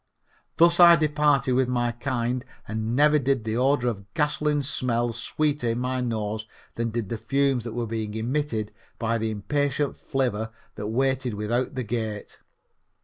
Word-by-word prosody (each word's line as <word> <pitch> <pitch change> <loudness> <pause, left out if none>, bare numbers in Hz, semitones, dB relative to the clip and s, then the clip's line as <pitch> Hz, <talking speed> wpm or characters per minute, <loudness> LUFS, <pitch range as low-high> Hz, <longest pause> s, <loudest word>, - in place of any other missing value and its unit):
Thus 170 +1 +5
I 170 -1 +10
departed 150 -3 +2
with 130 0 +3
my 120 -1 0
kind 120 0 -2 0.2
and 110 +2 -2
never 150 +2 +5
did 135 -3 0
the 110 0 -2
odor 130 0 +2
of 100 -4 -4
gasoline 150 -1 +1
smell 120 -3 -1
sweeter 145 +2 -1
in 115 +1 0
my 130 0 -1
nose 110 -2 -2 0.3
than 115 0 -2
did 115 -3 -3
the 115 - -3
fumes 135 +1 +1
that 115 - -5
were 120 0 -2
being 110 -1 -4
emitted 115 -2 -2 0.3
by 115 0 0
the 110 0 -1
impatient 145 +6 -1
flivver 120 -6 -1 0.2
that 105 0 -5
waited 130 0 0
without 120 +6 -1
the 130 - -2
gate. 110 -2 -4
120 Hz, 160 wpm, -25 LUFS, 110-140 Hz, 0.3 s, I